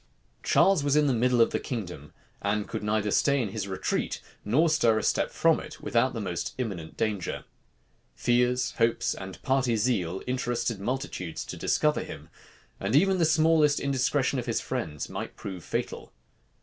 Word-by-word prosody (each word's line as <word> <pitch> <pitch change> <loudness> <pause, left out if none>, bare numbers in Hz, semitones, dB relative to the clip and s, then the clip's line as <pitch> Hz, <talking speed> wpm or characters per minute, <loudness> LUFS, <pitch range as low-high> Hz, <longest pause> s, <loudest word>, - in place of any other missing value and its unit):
Charles 195 -6 +4
was 145 0 +2
in 150 0 +4
the 135 - +2
middle 125 +1 +3
of 115 - +4
the - - 0
kingdom, 90 - -6 0.3
and 100 +1 0
could 110 - -4
neither 105 0 0
stay 140 +5 +3
in 115 -5 -1
his 100 0 -4
retreat, 95 -1 -2 0.2
nor 135 +11 +3
stir 120 -8 +3
a - - -1
step - - +1
from - - +3
it, - - -9
without 125 +2 +1
the - - -2
most 90 -5 -3
imminent 95 -11 -5
danger. 105 -4 -2 0.7
Fears, 125 +1 +2
hopes, 115 0 +2
and 95 0 -8
party 130 -3 +2
zeal 100 -6 0
interested 120 -3 -1
multitudes 110 - -4
to - - -6
discover - - +1
him; - - -9 0.5
and 100 +6 -1
even 190 +4 +4
the 165 - +4
smallest 155 -2 +4
indiscretion 135 0 +1
of 120 - -5
his 115 - 0
friends 85 - -4
might - - -6
prove 95 -4 -7
fatal. - - -4
120 Hz, 170 wpm, -28 LUFS, 100-135 Hz, 0.7 s, Charles